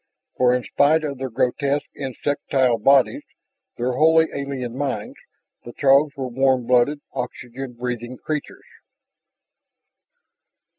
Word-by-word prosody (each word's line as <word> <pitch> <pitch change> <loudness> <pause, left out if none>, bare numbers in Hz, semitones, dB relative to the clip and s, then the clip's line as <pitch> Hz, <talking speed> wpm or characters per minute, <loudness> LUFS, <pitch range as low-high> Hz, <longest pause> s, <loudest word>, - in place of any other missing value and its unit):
For 125 0 +3
in 125 - -2
spite 155 +5 +2
of 140 -3 -4
their 130 0 -3
grotesque 140 +5 0
insectile 130 -2 -1
bodies, 135 +2 +4 0.6
their 125 +2 -1
wholly 160 +4 +4
alien 135 -4 -4
minds, 135 -6 -3 0.5
the 120 - -10
Throgs 140 +1 +3
were 135 -1 -3
warm 130 0 +1
blooded, 125 +4 +2
oxygen 125 0 -6
breathing 120 0 -5
creatures. 150 +2 -5
130 Hz, 110 wpm, -22 LUFS, 125-140 Hz, 0.6 s, bodies